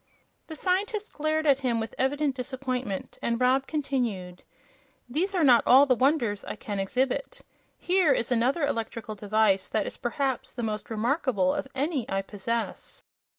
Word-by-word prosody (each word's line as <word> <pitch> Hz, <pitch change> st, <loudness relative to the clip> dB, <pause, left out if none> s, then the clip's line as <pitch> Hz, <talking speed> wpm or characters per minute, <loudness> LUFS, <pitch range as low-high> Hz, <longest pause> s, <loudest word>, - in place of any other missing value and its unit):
The 315 Hz, -, -7 dB
scientist 400 Hz, +5 st, -1 dB
glared 310 Hz, +1 st, 0 dB
at 275 Hz, -3 st, +4 dB
him 245 Hz, -4 st, 0 dB
with 225 Hz, 0 st, -4 dB
evident 280 Hz, +1 st, 0 dB
disappointment, 255 Hz, -5 st, -4 dB
and 235 Hz, 0 st, -1 dB
Rob 260 Hz, +2 st, +2 dB
continued: 235 Hz, -, -2 dB, 0.7 s
"These 350 Hz, +10 st, -1 dB
are 350 Hz, -, +2 dB
not 250 Hz, -5 st, +7 dB
all 265 Hz, +3 st, +8 dB
the 265 Hz, -, +4 dB
wonders 250 Hz, -5 st, +1 dB
I -, -, -6 dB
can 205 Hz, -1 st, -5 dB
exhibit. 265 Hz, -, -1 dB, 0.4 s
Here 360 Hz, -4 st, +3 dB
is 240 Hz, -2 st, 0 dB
another 255 Hz, +6 st, +2 dB
electrical 230 Hz, -4 st, -3 dB
device 205 Hz, -2 st, +1 dB
that 215 Hz, -2 st, 0 dB
is, -, -, -6 dB
perhaps, 260 Hz, +1 st, -2 dB
the 240 Hz, -, -5 dB
most 215 Hz, -1 st, -3 dB
remarkable 225 Hz, -, +1 dB
of -, -, -3 dB
any 280 Hz, -2 st, -1 dB
I 195 Hz, 0 st, -1 dB
possess." 225 Hz, +4 st, -4 dB
255 Hz, 155 wpm, -27 LUFS, 220-285 Hz, 0.7 s, all